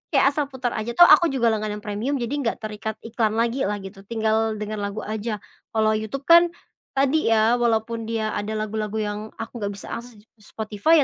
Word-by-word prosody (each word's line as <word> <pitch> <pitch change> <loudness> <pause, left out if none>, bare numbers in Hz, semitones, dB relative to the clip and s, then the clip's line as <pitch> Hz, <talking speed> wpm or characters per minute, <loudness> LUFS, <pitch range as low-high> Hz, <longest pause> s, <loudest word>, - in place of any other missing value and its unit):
kayak 275 - +5
asal 290 -1 -1
putar 260 -3 -3
aja, 235 +2 -4
toh 350 - +9
aku 345 0 +7
juga 235 -5 +2
langganan 210 -1 -3
premium, 215 +7 -2
jadi 245 +1 -2
nggak 235 -5 0
terikat 215 0 -4
iklan 225 -1 0
lagi 235 +1 +1
lah 210 - -1
gitu, 195 0 -9
tinggal 220 -1 +1
denger 210 0 -4
lagu 200 +1 -4
aja. 215 -1 -4 0.3
Kalau 220 0 +3
YouTube 220 +6 -3
kan, 340 +2 +7 0.5
tadi 275 +2 +2
ya, 225 +2 +4
walaupun 230 -1 0
dia 220 -1 -1
ada 215 +1 -3
lagu-lagu 215 0 -3
yang 210 -1 -2 0.2
aku 225 - -6
nggak 205 -1 -2
bisa - - -9
akses 235 0 -7
di 205 - -18 0.2
ss 210 - -19
Spotify, 220 +9 +3
220 Hz, 200 wpm, -24 LUFS, 215-240 Hz, 0.5 s, toh